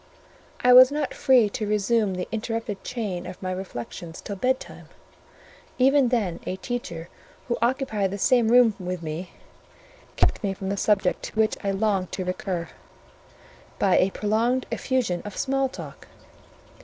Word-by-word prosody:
I 250 Hz, 0 st, +7 dB
was 255 Hz, +1 st, +9 dB
not 295 Hz, -1 st, -2 dB
free 250 Hz, -5 st, +4 dB
to 215 Hz, -1 st, -4 dB
resume 210 Hz, -1 st, +1 dB
the 180 Hz, -, -4 dB
interrupted 225 Hz, -2 st, -3 dB
chain 200 Hz, -8 st, -4 dB
of 180 Hz, -, -8 dB
my 185 Hz, -1 st, -4 dB
reflections 170 Hz, -2 st, -7 dB
till 200 Hz, -, -6 dB
bedtime: 255 Hz, +6 st, -2 dB, 0.9 s
even 270 Hz, +1 st, +4 dB
then 210 Hz, -8 st, 0 dB
a 185 Hz, -, -2 dB
teacher 185 Hz, -6 st, -5 dB, 0.4 s
who 240 Hz, -, 0 dB
occupied 235 Hz, -5 st, 0 dB
the 200 Hz, -, -4 dB
same 240 Hz, +2 st, +3 dB
room 240 Hz, -1 st, +6 dB
with 180 Hz, -1 st, -4 dB
me 160 Hz, +3 st, -5 dB, 0.9 s
kept -, -, +1 dB
me 195 Hz, -1 st, -1 dB
from 190 Hz, -1 st, -5 dB
the 200 Hz, -, 0 dB
subject 200 Hz, -2 st, +1 dB
to 220 Hz, -, -6 dB
which 220 Hz, 0 st, +3 dB
I 200 Hz, -, 0 dB
longed 195 Hz, -2 st, 0 dB
to 185 Hz, -, -3 dB
recur, 180 Hz, -1 st, -3 dB, 1.1 s
by 195 Hz, -2 st, +3 dB
a 185 Hz, -, +3 dB
prolonged 225 Hz, +6 st, 0 dB
effusion 240 Hz, -10 st, -1 dB
of 205 Hz, -2 st, -8 dB
small 270 Hz, 0 st, 0 dB
talk. -, -, -10 dB
210 Hz, 155 wpm, -25 LUFS, 185-245 Hz, 1.1 s, was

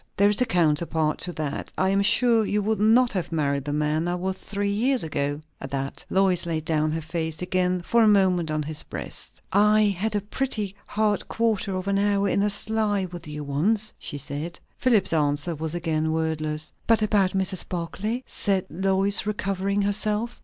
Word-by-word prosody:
"There 200 Hz, +1 st, +5 dB
is 205 Hz, +3 st, -1 dB
a 250 Hz, -, +3 dB
counterpart 160 Hz, -3 st, +1 dB
to 175 Hz, -, -1 dB
that. 150 Hz, -3 st, -4 dB
I 190 Hz, -, +2 dB
am 195 Hz, 0 st, +2 dB
sure 230 Hz, +2 st, +4 dB
you 210 Hz, 0 st, 0 dB
would 215 Hz, +1 st, 0 dB
not 235 Hz, +4 st, +5 dB
have 185 Hz, -5 st, -3 dB
married 140 Hz, -3 st, 0 dB
the 145 Hz, -, -2 dB
man 150 Hz, +2 st, 0 dB
I 175 Hz, -, 0 dB
was 185 Hz, +1 st, -2 dB
three 200 Hz, +1 st, -3 dB
years 245 Hz, +5 st, +1 dB
ago." 145 Hz, -2 st, -2 dB, 0.2 s
At 135 Hz, -, -6 dB
that 135 Hz, 0 st, -4 dB
Lois 185 Hz, -2 st, +2 dB
laid 160 Hz, -2 st, -2 dB
down 155 Hz, -1 st, +1 dB
her 160 Hz, +1 st, -3 dB
face 160 Hz, -1 st, -3 dB
again 180 Hz, 0 st, 0 dB
for 235 Hz, +6 st, +3 dB
a 220 Hz, -, +5 dB
moment 185 Hz, -5 st, +3 dB
on 155 Hz, 0 st, -1 dB
his 155 Hz, 0 st, -3 dB
breast. -, -, -6 dB
"I 210 Hz, +2 st, +5 dB
had 210 Hz, +4 st, -1 dB
a 205 Hz, -, +1 dB
pretty 210 Hz, -2 st, -2 dB
hard 210 Hz, -1 st, 0 dB
quarter 220 Hz, -4 st, 0 dB
of 185 Hz, +1 st, -4 dB
an 200 Hz, 0 st, +2 dB
hour 200 Hz, 0 st, +2 dB
in 200 Hz, -, +1 dB
a 205 Hz, -, +2 dB
sleigh 205 Hz, -1 st, +1 dB
with 175 Hz, -2 st, -9 dB
you 150 Hz, 0 st, -5 dB
once!" 200 Hz, +10 st, 0 dB
she 145 Hz, -, -5 dB
said. 145 Hz, +5 st, -5 dB, 0.2 s
Philip's 230 Hz, -9 st, +2 dB
answer 150 Hz, +2 st, +1 dB
was 160 Hz, +1 st, -4 dB
again 160 Hz, -2 st, -1 dB
wordless. 155 Hz, -1 st, -2 dB, 0.2 s
"But 225 Hz, -1 st, +4 dB
about 200 Hz, -3 st, +2 dB
Mrs. 190 Hz, -1 st, 0 dB
Barclay?" 200 Hz, +8 st, -3 dB
said 195 Hz, -2 st, 0 dB
Lois, 195 Hz, +3 st, +1 dB
recovering 200 Hz, -1 st, -1 dB
herself. 210 Hz, +3 st, -1 dB
190 Hz, 190 wpm, -25 LUFS, 160-205 Hz, 0.2 s, There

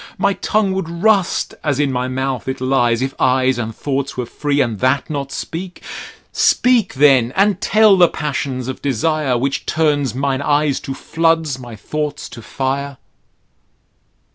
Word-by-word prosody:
My 200 Hz, -, +2 dB
tongue 205 Hz, -1 st, 0 dB
would 190 Hz, -4 st, -3 dB
rust 190 Hz, +2 st, +1 dB
as 145 Hz, -3 st, 0 dB
in 145 Hz, -2 st, +1 dB
my 125 Hz, 0 st, -1 dB
mouth 130 Hz, 0 st, -3 dB
it 130 Hz, -, -3 dB
lies, 125 Hz, -2 st, +1 dB
If 135 Hz, 0 st, -3 dB
eyes 130 Hz, -1 st, +2 dB
and 110 Hz, -1 st, -4 dB
thoughts 140 Hz, -1 st, -3 dB
were 125 Hz, -, -2 dB
free, 145 Hz, +4 st, -2 dB
and 115 Hz, -6 st, 0 dB
that 130 Hz, +3 st, +1 dB
not 140 Hz, -2 st, -4 dB
speak. 180 Hz, +2 st, -6 dB, 0.5 s
Speak 245 Hz, -9 st, +2 dB
then, 130 Hz, -4 st, +4 dB
and 195 Hz, 0 st, +2 dB
tell 215 Hz, -2 st, +5 dB
the 180 Hz, -2 st, +6 dB
passions 140 Hz, -4 st, -3 dB
of 130 Hz, -, -5 dB
desire; 140 Hz, 0 st, 0 dB
Which 135 Hz, +3 st, -2 dB
turns 145 Hz, -6 st, +1 dB
mine 135 Hz, 0 st, -1 dB
eyes 145 Hz, -1 st, +1 dB
to 135 Hz, -, -6 dB
floods, 165 Hz, -4 st, 0 dB
my 120 Hz, -3 st, -9 dB
thoughts 150 Hz, +6 st, -4 dB
to 115 Hz, -, -10 dB
fire. 135 Hz, +3 st, -3 dB
140 Hz, 160 wpm, -18 LUFS, 130-160 Hz, 0.5 s, the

